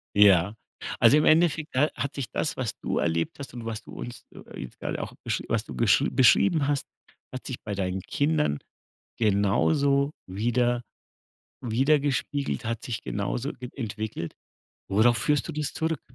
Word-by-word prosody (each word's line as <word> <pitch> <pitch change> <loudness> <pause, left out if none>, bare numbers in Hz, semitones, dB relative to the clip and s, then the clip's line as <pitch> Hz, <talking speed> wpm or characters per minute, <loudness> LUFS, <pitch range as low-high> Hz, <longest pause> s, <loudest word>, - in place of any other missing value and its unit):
Ja, 100 -1 +6 0.4
also, - - +7
im 150 - +3
Endeffekt, 160 -1 +3
ne, 145 +4 +4
hat 140 - -3
sich 140 -4 -4
das, 155 - -1
was 125 -5 -3
du - - -2
erlebt 85 0 0
hast 140 - -8
und 120 -2 -7
was 115 -1 -4
du - - -13
uns 120 -1 -8 0.3
jetzt 65 - -8
grade - - -3
auch - - -6
besch - - -1
was - - 0
du - - -9
gesch 65 - +4
beschrieben 140 +4 +4
hast, 145 -2 0 0.5
hat 130 - -7
sich 130 - -5
bei 105 -1 -4
deinen 95 -1 -2
Kindern 150 - +1 0.6
genauso 140 +7 +2 0.2
wieder 120 +5 +1 0.8
widergespiegelt, 140 +3 0
hat 115 0 -3
sich 120 -3 -4
genauso 115 +7 -2
e 125 - -5
entwickelt. 110 - -4 0.5
Worauf 110 +4 +4
führst 145 +5 +1
du - - -3
das 150 -1 -2
zurück? 160 -2 -1
120 Hz, 160 wpm, -27 LUFS, 105-145 Hz, 0.8 s, also